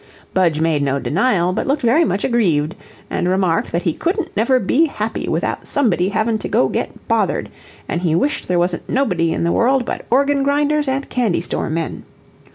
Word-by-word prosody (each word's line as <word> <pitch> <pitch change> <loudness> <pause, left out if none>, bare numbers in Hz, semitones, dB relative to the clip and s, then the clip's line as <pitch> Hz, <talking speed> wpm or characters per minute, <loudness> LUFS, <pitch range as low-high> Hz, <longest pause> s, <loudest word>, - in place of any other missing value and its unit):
Budge 170 -5 +2
made 160 -2 +1
no 140 -1 0
denial, 180 - +1
but - - -2
looked 280 +1 0
very 255 +8 +4
much 200 -10 -1
aggrieved, 175 - +1 0.4
and 175 - 0
remarked 185 -3 +1
that 170 +1 -1
he 165 - +1
couldn't 375 - -2
never 235 +5 +3
be 265 +9 +2
happy 220 -5 -4
without - - -2
somebody 195 -10 +1
having 220 +1 0
to - - -5
go 130 - +2
get - - -4
bothered; - - 0 0.4
and 175 - -2
he 165 -3 +1
wished 285 - 0
there 180 - +1
wasn't 175 0 -1
nobody 180 -11 +1
in - - -1
the 170 - +1
world 255 +4 +2
but - - -5
organ 280 +3 +2
grinders 290 +1 +1
and 270 +1 -1
candy 235 -8 0
store 170 - -3
men. 165 +1 -3
205 Hz, 190 wpm, -19 LUFS, 170-270 Hz, 0.4 s, very